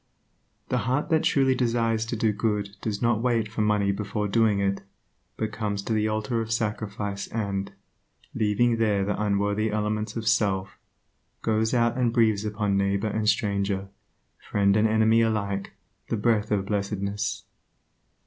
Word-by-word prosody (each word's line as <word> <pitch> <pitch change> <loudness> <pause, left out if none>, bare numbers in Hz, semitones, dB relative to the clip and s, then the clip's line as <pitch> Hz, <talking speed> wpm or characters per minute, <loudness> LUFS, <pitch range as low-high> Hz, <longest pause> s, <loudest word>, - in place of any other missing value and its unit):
The 125 - +1
heart 145 +6 0
that 160 -2 +3
truly 135 -2 +3
desires 115 -3 0
to 120 - -2
do 110 -1 +1
good 105 -1 -1
does 105 0 -3
not 115 -2 +2
wait 115 -3 +1
for 110 +1 -3
money 105 -2 +2
before 105 +1 -2
doing 105 -1 +2
it, 100 0 0 0.6
but 110 -1 -2
comes 105 -2 -3
to 110 - -2
the 110 0 +1
altar 110 +2 -1
of 110 0 -5
sacrifice 105 -2 -2
and, 100 -3 -3 0.6
leaving 115 +3 +2
there 105 -3 +1
the 105 +1 -2
unworthy 105 +1 +1
elements 105 0 -2
of 115 -1 -4
self, 100 -3 +1 0.6
goes 110 +2 +1
out 120 +1 +2
and 120 -2 +2
breathes 110 -3 +3
upon 105 -2 0
neighbor 100 +2 +1
and 105 0 0
stranger, 100 -2 0 0.6
friend 100 -1 +3
and 110 +1 +4
enemy 110 +1 +4
alike 100 -3 -1 0.4
the 115 - 0
breath 105 0 +1
of 100 -2 0
blessedness. 100 0 -2
105 Hz, 155 wpm, -26 LUFS, 100-115 Hz, 0.6 s, and